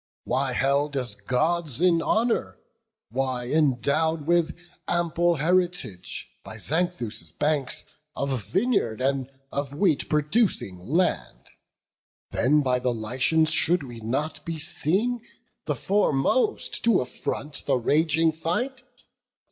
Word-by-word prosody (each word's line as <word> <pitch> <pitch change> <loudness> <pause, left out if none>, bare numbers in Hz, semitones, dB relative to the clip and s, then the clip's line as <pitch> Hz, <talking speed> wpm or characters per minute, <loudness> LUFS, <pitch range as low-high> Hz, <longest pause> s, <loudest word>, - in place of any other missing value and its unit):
Why - - 0
held 140 +1 +1
as 125 -5 -1
Gods 140 +7 0
in 170 -1 +4
honour? 220 - 0 0.5
why 130 -1 -1
endow'd 150 +2 +1
With 170 0 +2 0.3
ample 175 0 +1
heritage, 170 - -1 0.2
by 110 +2 -8
Xanthus' 125 - -2
banks, 145 - 0 0.3
Of 135 -5 -2
vineyard, 185 - 0
and 135 0 0 0.2
of 140 0 -3
wheat 155 -2 +1
producing 150 - +1
land? 155 - -1 0.8
Then 150 +5 +3
by 125 -1 +1
the 125 0 0
Lycians 130 +8 +1
should 170 +1 +3
we 120 -3 -9
not 135 +8 -3
be 165 -1 -4
seen 200 +10 +1 0.4
The - - -1
foremost 210 - +1
to 230 -5 +5
affront 140 +3 -4
the 140 - +3
raging 160 +5 +3
fight? 240 - -2
150 Hz, 115 wpm, -25 LUFS, 130-170 Hz, 0.8 s, to